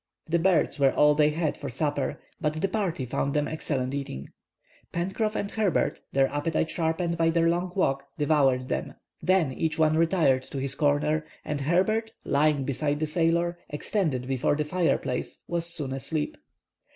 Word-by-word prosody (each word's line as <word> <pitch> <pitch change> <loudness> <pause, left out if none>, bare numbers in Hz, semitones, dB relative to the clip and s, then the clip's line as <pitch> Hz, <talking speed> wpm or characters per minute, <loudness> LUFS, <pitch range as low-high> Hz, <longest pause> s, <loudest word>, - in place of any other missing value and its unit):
The 170 +1 +2
birds 175 -3 +2
were 135 -1 +5
all 150 0 +5
they 150 0 +4
had 155 0 -1
for 140 - -6
supper, 145 +2 -2 0.2
but 155 0 -1
the 195 - +1
party 185 -9 -2
found 140 +3 -1
them 150 0 +1
excellent 135 -4 -2
eating. 135 - -5 0.6
Pencroff 195 +5 -1
and 200 - -2
Herbert, 215 -5 0
their 135 0 +3
appetite 155 +2 -1
sharpened 170 0 -1
by 165 0 +4
their 165 0 +3
long 175 +1 0
walk, 135 -7 +1
devoured 140 -4 +2
them. - - -3 0.3
Then 180 -6 +3
each 160 +2 -1
one 155 -1 +3
retired 160 -5 +3
to - - -7
his 135 0 -1
corner, 150 +2 +1 0.2
and 150 -1 -2
Herbert, 215 +9 +1
lying 145 0 +2
beside 145 +2 -1
the 155 - +1
sailor, 170 +2 +1
extended 150 - -1
before 135 +1 +1
the 150 0 -1
fireplace, 160 -6 -1
was 170 -1 -1
soon 145 -6 -3
asleep. 150 +3 -2
155 Hz, 165 wpm, -27 LUFS, 140-170 Hz, 0.6 s, were